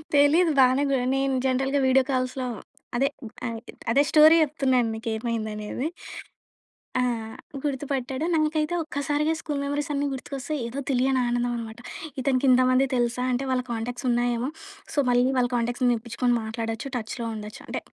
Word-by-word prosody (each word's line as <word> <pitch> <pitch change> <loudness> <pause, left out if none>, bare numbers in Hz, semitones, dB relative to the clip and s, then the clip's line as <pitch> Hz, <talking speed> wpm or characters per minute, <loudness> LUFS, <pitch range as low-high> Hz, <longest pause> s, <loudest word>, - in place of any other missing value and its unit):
తెలీదు. 310 +4 +5
బానే 260 +2 +5
గున్ 250 -2 +1
నేను 270 0 +1
జనరల్‌గా 265 +2 +1
వీడియో 260 0 +5
కాల్స్‌లో 255 0 -1 0.5
అదే 270 +3 +3 0.4
ఆహ్, 230 -1 -4 0.3
అదే 275 +5 +5
స్టోరీ 310 +1 +8
చెప్తున్నాను 260 -5 +1
మీకు 225 +2 -8
ఏమైందనేది. 220 +2 -3 1.1
ఆ! - - +3 0.6
గుర్తుపట్టాడు. 270 0 -2
నాకైతే 310 +1 +1
ఒక్కసారిగా 295 +1 0
స్కూల్ 295 -3 -3
మెమోరీస్ 285 +1 -2
అన్నీ 285 0 0
గుర్తుకొస్తాయి, 275 +3 -4
ఏదో 265 +4 -5
తెలియని 260 0 +2
ఆనందం 240 0 0
అనమాట. 225 0 -7 0.4
ఇతనికి 260 0 +1
ఇంతమంది 255 +1 +4
తెలుసా? 240 0 0
అంటే 250 +2 0
వాళ్ళ 255 - +2
కాంటాక్ట్స్ 235 +3 -4
ఉన్నాయేమో, 240 +1 +1 0.4
సో, - - -9
మళ్ళీ 245 0 +4
వాళ్ళ 245 -1 +3
కాంటాక్ట్స్ 240 +2 -1
తెప్పించుకొని 235 +2 -1
మాట్లాడొచ్చు 225 +3 -4
టచ్‌లో 230 +1 -5
ఉండొచ్చు. 210 0 -8
అంటే - - -3
255 Hz, 140 wpm, -25 LUFS, 240-280 Hz, 1.1 s, స్టోరీ